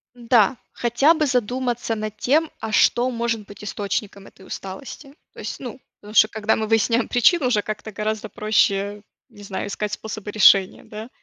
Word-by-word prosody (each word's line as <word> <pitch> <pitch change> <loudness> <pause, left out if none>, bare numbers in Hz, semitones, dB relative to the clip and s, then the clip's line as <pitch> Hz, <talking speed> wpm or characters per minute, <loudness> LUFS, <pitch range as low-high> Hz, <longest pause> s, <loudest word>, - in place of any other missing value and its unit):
М-да. 240 -1 +3 0.2
Хотя 245 +7 +3
бы 310 -2 0
задуматься 245 -2 -1
над 215 0 -5
тем, 310 +5 +2
а 220 - -5
что 240 +3 +3
может 235 -3 -2
быть 205 +1 -13
источником 200 -1 -4
этой 190 - -17
усталости. 245 +10 -8 0.2
То - - -14
есть, - - -6
ну, 255 0 -8 0.2
потому 210 +1 -12
что, 215 - +7
когда 220 0 0
мы 220 -1 -2
выясняем 230 +1 +2
причину, 255 +4 +3
уже 230 -4 +2
как-то 215 +1 -6
гораздо 215 +1 -3
проще, 205 -1 +1 0.3
не 205 -4 -15
знаю, 195 -1 -4
искать 210 0 -4
способы 215 -1 -6
решения, 195 -2 +5
да. 215 +2 -9
220 Hz, 170 wpm, -22 LUFS, 210-245 Hz, 0.3 s, что